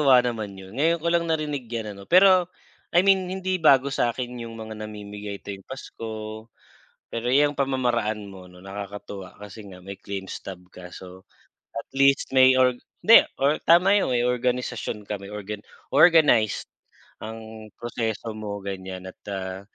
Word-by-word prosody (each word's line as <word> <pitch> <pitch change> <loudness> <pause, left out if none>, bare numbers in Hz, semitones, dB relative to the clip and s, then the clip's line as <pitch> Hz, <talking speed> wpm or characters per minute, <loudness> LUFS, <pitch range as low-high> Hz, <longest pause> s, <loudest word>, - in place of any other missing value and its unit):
Nakakatuwa 135 -3 +7
naman 110 -5 -4
yun, 95 +3 -11
ngayon 165 +5 +2
ko 165 - -6
lang 170 0 +2
narinig 150 -6 -2
yan 110 -3 -4
ano. 100 - -12
Pero 185 -1 +6 0.4
I 180 +3 +5
mean 190 -2 +3
hindi 190 0 -1
bago 135 -2 +5
sa'kin 120 0 -2
yung 115 -1 -8
mga 110 0 -7
namimigay 105 -1 -7
tuwing 100 -1 -7
Pasko 110 -3 -7 0.6
pero 115 +1 -2
yang 145 +2 +4
pamamaraan 120 -6 0
mo 95 -2 -11
'no, 90 - -16
nakakatuwa 100 -1 -8
kasi 105 +1 -10
nga 90 -1 -11
may 100 0 -8
claim 100 -1 -5
stub 90 -2 -8
ka. 90 -1 -10
So 95 0 -12 0.5
at 115 - -6
least 140 0 +3
may 130 0 +8
or 125 -1 +4 0.3
hindi 230 - +8 0.4
tama 180 +5 +6
yung 130 - 0
may 120 0 +2
organisasyon 125 -4 -2
ka 105 - -2
may 100 - -10
organ 105 0 -6 0.3
organize 145 - +5 0.5
ang 110 0 -9
proseso 115 -2 -3
mo 105 -2 -5
ganyan 95 -1 -6
at - - -23
ah, 95 -1 -4
115 Hz, 160 wpm, -25 LUFS, 100-135 Hz, 0.6 s, may